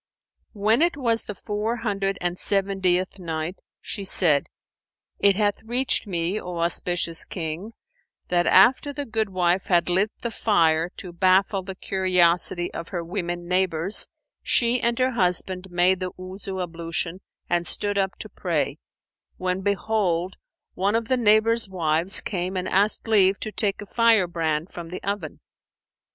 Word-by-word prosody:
When 215 +4 +2
it 340 -3 +2
was 230 -4 0
the 210 - -6
Four 210 +4 -3
Hundred 195 -4 -2
and 175 0 -2
Seventieth 190 -2 0
Night, 165 +1 -4 0.2
She 200 - -5
said, 165 -6 +3 0.7
It 200 -1 +5
hath 205 0 0
reached 245 +1 0
me, 175 +2 -1
O 180 -1 -6
auspicious 170 0 0
King, 170 +5 -5 0.6
that 175 -1 +2
after 265 +4 +5
the 285 0 -4
goodwife 190 -5 0
had 175 -1 +2
lit 190 +4 +2
the 235 - -3
fire 165 -7 +2
to 180 -2 -7
baffle 190 +2 +2
the 190 0 -8
curiosity 180 -2 +1
of 170 - -6
her 175 -3 -4
women 175 -1 -4
neighbours, 180 0 +2 0.3
she 240 +1 +2
and 235 0 +1
her 255 0 +2
husband 185 -3 -1
made 180 +1 +3
the 185 -1 -3
Wuzu 190 +1 -7
ablution 170 +1 -4 0.3
and 175 -1 0
stood 205 +4 -1
up 190 -1 -1
to - - -6
pray, - - -2 0.6
when 185 0 -2
behold, 190 -3 0 0.4
one 200 +3 0
of 230 0 -1
the 255 - +3
neighbours' 225 -1 +3
wives 170 +1 +1
came 185 -1 -3
and 185 - -2
asked 205 +4 +2
leave 195 -3 +4
to 215 - -4
take 205 -2 0
a - - -11
fire 225 -2 +3
brand 165 -1 -2
from 170 -1 -8
the 180 - -7
oven. 200 +1 -4
190 Hz, 150 wpm, -24 LUFS, 175-210 Hz, 0.7 s, It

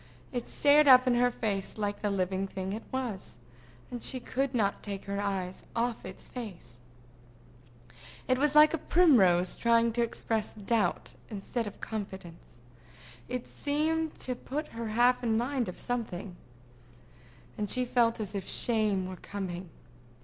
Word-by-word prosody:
It 245 -1 -3
stared 290 +1 +5
up 255 -1 +9
in 250 - +3
her 245 +1 +4
face 210 -5 -3
like 205 -1 -2
the 210 - 0
living 190 0 -1
thing 190 0 -4
it 220 - -4
was, 230 - -4 0.5
and 245 -1 -5
she 255 - -1
could 265 +2 -2
not 200 -4 +1
take 200 -2 -6
her 200 0 -2
eyes 190 -2 -3
off 235 0 -1
its - - -11
face. 175 - -8 1.5
It 255 0 +2
was 295 +1 +2
like 305 +1 +8
a 325 - 0
primrose 195 - +4
trying 230 -1 +3
to 240 - 0
express 225 -2 -2
doubt 210 -2 0 0.2
instead 220 +2 -3
of 205 - -9
confidence. 190 - -7 0.7
It 250 -1 -3
seemed 315 +2 -1
to 255 - 0
put 285 +5 -5
her 230 0 -5
half 240 +3 +3
in 225 -2 +2
mind 245 -1 0
of 180 - -8
something, 210 -7 -4 1.2
and 210 -1 -3
she 250 +3 +1
felt 235 -1 +2
as 210 -2 -4
if 195 -2 -4
shame 215 -5 +1
were 185 0 -6
coming. 185 -3 -6
225 Hz, 155 wpm, -30 LUFS, 195-250 Hz, 1.5 s, up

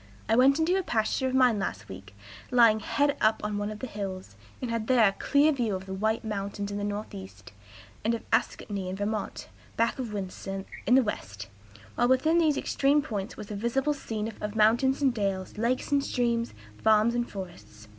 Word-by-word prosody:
I 225 - +3
went 265 +4 +5
into 325 +3 +2
a - - +1
pasture 240 -2 0
of 260 - -1
mine 250 -5 +4
last 105 - -4
week, 95 +1 -11 0.3
lying 230 -3 +5
high 285 +6 +1
up 220 0 +3
on 210 -1 -2
one 205 0 -2
of 215 - -6
the 260 - -5
hills, 190 - -6 0.2
and 250 -2 -4
had 230 -1 -2
there 245 -4 +5
a - - +2
clear 285 +9 +3
view 235 -8 -1
of 190 0 -6
the 190 - -6
White 220 +4 -1
Mountains 200 -1 -4
in 205 - -3
the - - -3
northeast, 100 - -6 0.5
and 230 +2 +1
of 230 - -7
Ascutney, 200 -4 -1
in 185 - -4
Vermont, 205 +1 -3 0.3
back 230 +3 +1
of 240 -4 -4
Windsor, 195 -1 -5 0.2
in 250 - +6
the 265 - +6
west; 100 - -5 0.4
while 240 - +2
within 310 +7 +3
these 310 -4 +3
extreme 285 +1 +2
points 210 -5 -5
was 210 -1 -8
a - - -3
visible 250 +7 0
scene 225 -5 -4
of 210 0 -4
mountains 240 +6 +3
and 265 -3 +4
dales, 195 -3 -3
lakes 245 +5 0
and 280 -1 +3
streams, 235 - -1 0.3
farms 220 +1 +4
and 240 0 -1
forests. 175 - -9
220 Hz, 200 wpm, -28 LUFS, 200-250 Hz, 0.5 s, in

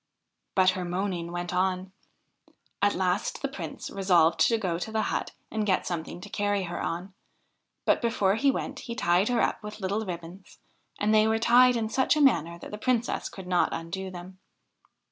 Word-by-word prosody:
But 185 -1 +5
her 185 0 -4
moaning 175 -1 -2
went 175 0 -4
on. 185 +1 0 0.9
At 205 0 +3
last 185 +2 -1
the - - +2
Prince - - -7
resolved 175 -4 +3
to 230 - +2
go 180 -6 -2
to 220 - -5
the 220 0 0
hut - - -2 0.2
and 220 -1 -1
get 195 -3 +1
something 170 0 -4
to 205 - -8
carry 205 -1 0
her 175 -1 -4
on, 180 +3 -4 0.7
but - - +3
before 215 -5 +2
he 275 +7 +2
went 270 - -2
he 235 -1 -6
tied 180 -1 +2
her 240 -2 +2
up - - 0
with 210 0 -8
little 200 +3 -1
ribbons, 180 0 -8 0.4
and 210 +1 +2
they 215 0 +5
were 220 0 +2
tied 245 +2 +5
in 225 -2 0
such 260 +6 +2
a - - +2
manner 170 - +3
that - - -10
the 210 - -6
Princess 240 0 0
could 190 - -10
not 180 -1 +2
undo 190 +3 -4
them. 185 +1 -10
190 Hz, 190 wpm, -27 LUFS, 180-220 Hz, 0.9 s, But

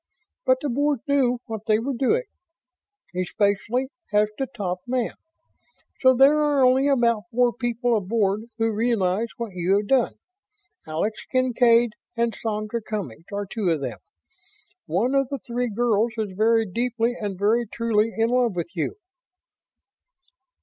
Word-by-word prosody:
But 255 - +5
the 290 - -2
Board 285 0 0
knew 265 -3 +2
what 220 -3 -7
they 215 - +4
were 260 +5 -2
doing 275 - +1 0.9
especially 205 +7 0 0.2
as 210 0 +3
to 270 - -1
top 185 -6 -4
man 250 -2 -1 0.9
so 260 -1 +5
there 280 +4 +5
are 290 -3 +3
only 260 +2 +4
about 235 -5 +2
four 245 0 +2
people 240 0 0
aboard 210 0 0
who 225 -1 +1
realize 215 -2 +1
what 230 -4 -5
you 180 +2 +2
have 205 - -1
done. 255 +2 +2 0.7
Alex 165 +8 -2
Kincaid 240 -2 +3 0.3
and 235 -1 +1
Sandra 215 +1 -3
Cummings 185 - -6
are 205 0 -3
two 200 -1 -2
of 160 -4 0
them. - - -4 0.9
One 200 - +1
of 275 -1 +2
the 280 - -3
three 245 0 -3
girls 225 0 +1
is 215 -3 -2
very 225 +2 +3
deeply 235 +3 -1
and 205 -5 -5
very 220 +4 +2
truly 225 0 0
in 225 +1 +2
love 245 -4 +2
with 170 +2 -4
you." 170 - -2
230 Hz, 150 wpm, -24 LUFS, 210-250 Hz, 0.9 s, But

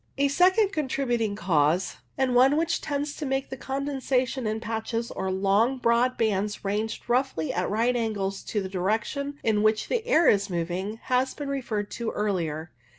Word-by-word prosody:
A 280 0 +3
second 375 +7 +4
contributing 255 - -1
cause, 170 -2 +1 0.2
and 265 -2 +1
one 265 +4 +5
which 330 +1 0
tends 290 0 -3
to - - -5
make 270 -1 -2
the - - -3
condensation 265 -2 -1
in 215 +1 -1
patches 225 +1 -3
or 190 - -3
long 200 +7 +2
broad 245 +1 +2
bands 210 -2 -1
ranged 210 +3 -2
roughly 245 - 0
at 180 +1 -1
right 230 +4 +1
angles 205 -4 -2
to 210 -2 -2
the - - -3
direction 220 +10 -2
in 215 -2 +2
which 215 0 +2
the 470 -2 0
air 345 -10 +4
is 200 -1 +3
moving, 180 +4 -3
has 255 +1 +1
been 290 -2 -5
referred 230 -7 -3
to 235 -1 -3
earlier. 170 -6 -2
230 Hz, 170 wpm, -26 LUFS, 200-270 Hz, 0.2 s, one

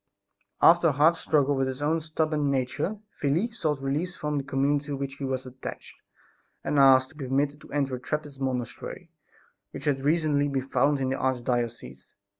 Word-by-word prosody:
After 170 0 +7
a - - +4
hard 155 +5 +4
struggle 145 -3 +2
with 135 0 +1
his 130 0 -4
own 155 +3 +1
stubborn 155 -2 0
nature, 135 +10 -1 0.2
Felix 180 +12 0
sought 150 -4 -1
release 150 +7 -1
from 150 -1 -2
the - - -4
community 140 +2 0
to 145 -1 -3
which 135 0 -5
he 140 - -7
was 130 -1 -2
attached 130 0 -9 0.6
and 145 - +1
asked 130 -1 +6
to - - -20
be 140 -4 -6
permitted 140 +3 0
to - - -15
enter 140 -3 0
a - - -11
Trappist 145 0 -5
monastery 125 -3 -4 0.6
which - - -9
had 135 -2 0
recently 150 -2 +2
been 135 -2 -1
founded 135 +1 +2
in 130 - 0
the 135 - -1
arch 130 -2 0
diocese. 120 - -3
140 Hz, 190 wpm, -27 LUFS, 130-150 Hz, 0.6 s, After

